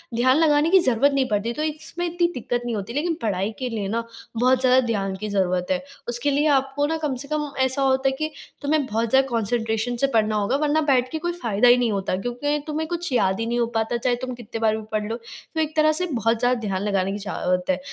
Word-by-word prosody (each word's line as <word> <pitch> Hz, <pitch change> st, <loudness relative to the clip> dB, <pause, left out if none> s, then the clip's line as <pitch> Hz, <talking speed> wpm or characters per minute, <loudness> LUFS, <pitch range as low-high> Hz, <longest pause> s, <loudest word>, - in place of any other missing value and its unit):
ध्यान 255 Hz, +3 st, +4 dB
लगाने 305 Hz, -1 st, +4 dB
की 380 Hz, +2 st, +6 dB
ज़रूरत 255 Hz, +3 st, +4 dB
नहीं 270 Hz, -2 st, +1 dB
पड़ती। 215 Hz, +2 st, 0 dB
तो 305 Hz, -, -3 dB
इसमें 315 Hz, +3 st, -4 dB
इतनी 345 Hz, 0 st, +1 dB
दिक्कत 245 Hz, -2 st, -2 dB
नहीं 235 Hz, -2 st, -2 dB
होती, 205 Hz, +2 st, -5 dB
लेकिन 320 Hz, +5 st, 0 dB
पढ़ाई 200 Hz, -1 st, -1 dB
के 255 Hz, -1 st, -2 dB
लिए 215 Hz, -4 st, -3 dB
ना 230 Hz, +3 st, -1 dB, 0.3 s
बहुत 255 Hz, +2 st, +3 dB
ज़्यादा 255 Hz, 0 st, +5 dB
ध्यान 195 Hz, -4 st, -1 dB
की 210 Hz, +2 st, -5 dB
ज़रूरत 185 Hz, -3 st, 0 dB
है। 275 Hz, -1 st, 0 dB, 0.2 s
उसके 240 Hz, +4 st, 0 dB
लिए 290 Hz, +2 st, +2 dB
आपको 270 Hz, +2 st, -1 dB
ना 320 Hz, +1 st, -1 dB
कम 275 Hz, -3 st, -1 dB
से -, -, -11 dB
कम 300 Hz, -1 st, -2 dB
ऐसा 260 Hz, +1 st, -1 dB
होता 265 Hz, 0 st, +3 dB
है 265 Hz, -, -3 dB
कि 310 Hz, 0 st, -2 dB, 0.3 s
तुम्हें 290 Hz, 0 st, +1 dB
बहुत 225 Hz, -1 st, -1 dB
ज़्यादा 265 Hz, +2 st, +4 dB
कंसंट्रेशन 225 Hz, +1 st, -1 dB
से -, -, +2 dB
पढ़ना 215 Hz, 0 st, +2 dB
होगा 210 Hz, +5 st, +1 dB
वरना 305 Hz, +1 st, +2 dB
बैठ 255 Hz, -2 st, +3 dB
के 320 Hz, -, -2 dB
कोई 345 Hz, +2 st, -1 dB
फ़ायदा 220 Hz, +1 st, +2 dB
ही 245 Hz, +1 st, +7 dB
नहीं 240 Hz, -2 st, +1 dB
होता। 195 Hz, -2 st, -1 dB
क्योंकि 245 Hz, +6 st, -1 dB
तुम्हें 310 Hz, +1 st, -2 dB
कुछ 345 Hz, -1 st, -3 dB
याद 190 Hz, -5 st, +2 dB
ही 225 Hz, -, -1 dB
नहीं 240 Hz, +1 st, -1 dB
हो 235 Hz, -, +3 dB
पाता 225 Hz, +2 st, 0 dB
चाहे 245 Hz, +1 st, +1 dB
तुम 255 Hz, -, -5 dB
कितने 235 Hz, -1 st, -7 dB
बार 220 Hz, -1 st, +2 dB
भी 220 Hz, -, -7 dB
पढ़ 210 Hz, -1 st, -1 dB
लो। 230 Hz, -, -2 dB
तो 240 Hz, +6 st, -9 dB
एक 310 Hz, 0 st, -2 dB
तरह 310 Hz, 0 st, +4 dB
से -, -, +1 dB
बहुत 230 Hz, -1 st, +1 dB
ज़्यादा 245 Hz, 0 st, +2 dB
ध्यान 190 Hz, -1 st, -1 dB
लगाने 195 Hz, -2 st, 0 dB
की 200 Hz, -, -3 dB
ज़रूरत 180 Hz, 0 st, 0 dB
है। 185 Hz, -1 st, +2 dB
245 Hz, 250 wpm, -23 LUFS, 220-285 Hz, 0.3 s, ही